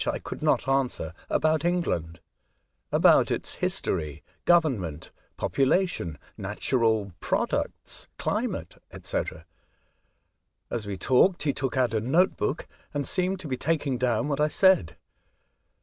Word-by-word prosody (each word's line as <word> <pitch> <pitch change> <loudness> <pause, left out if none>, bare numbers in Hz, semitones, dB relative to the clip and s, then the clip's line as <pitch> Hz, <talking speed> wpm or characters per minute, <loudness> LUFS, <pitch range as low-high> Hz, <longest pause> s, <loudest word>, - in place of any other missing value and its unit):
I - - 0
could - - -8
not - - +2
answer, 130 - 0 0.2
about 155 0 +2
England; 85 - -1 0.7
about - - +5
its - - -1
liistorj, 75 -2 -2 0.2
government, 115 - +1 0.3
population, 135 - 0 0.2
natural 110 -5 0
products, - - -1
climate, - - -3 0.2
&c. - - 0 1.5
As 110 -3 -3
we 100 -2 -4
talked, 135 - +3
he 145 -2 +1
took 135 -1 -3
out 125 -3 +2
a 110 - +1
note 160 - +3
book, 145 - -2 0.3
and 145 -1 -1
seemed 185 +1 +2
to 165 - -6
be 130 -2 -2
taking 140 -3 0
down 120 0 +1
what 145 -1 -1
I 150 - +4
said. 155 - +3
130 Hz, 125 wpm, -27 LUFS, 105-160 Hz, 1.5 s, about